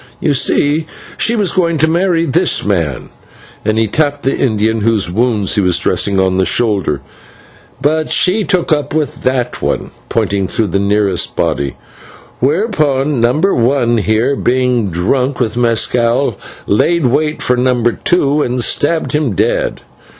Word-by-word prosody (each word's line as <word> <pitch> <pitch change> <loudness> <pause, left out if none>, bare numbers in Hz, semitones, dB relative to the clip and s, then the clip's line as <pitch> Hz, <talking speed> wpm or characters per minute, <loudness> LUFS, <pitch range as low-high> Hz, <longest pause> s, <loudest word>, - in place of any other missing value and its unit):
"You 150 - +1
see, 150 +3 +1 0.3
she 235 - +1
was 205 -5 0
going 170 -3 +1
to 160 +2 +2
marry 170 0 +1
this 170 +4 +1
man," 85 -10 -2 0.5
and 110 +1 0
he 110 - +2
tapped 145 +4 -1
the 135 - 0
Indian 110 -2 0
whose 105 -5 +1
wounds 110 -2 0
he 105 - +2
was 90 -2 +2
dressing 100 -1 +1
on 95 0 +1
the - - +3
shoulder, 95 - 0 0.8
"but 155 +2 0
she 200 +4 +2
took 180 -4 +1
up 145 0 -2
with 155 -2 -2
that 130 -1 -1
one," - - -2 0.2
pointing 100 -1 0
to 110 - -1
the 100 0 -1
nearest 100 -2 0
body, 70 -3 -1 0.7
"whereon 150 - 0
Number 150 +12 +2
One 120 -1 +1
here, 110 +6 +1
being 125 -4 0
drunk 125 +10 -1
with 115 -4 0
/mescal/, 120 +2 +1 0.3
laid 165 +10 +1
wait 150 +5 0
for 125 - +2
Number 125 -1 +1
Two 150 0 +1
and 125 -2 -1
stabbed 160 +6 0
him 150 -7 0
dead. - - -1
125 Hz, 150 wpm, -14 LUFS, 105-150 Hz, 0.8 s, the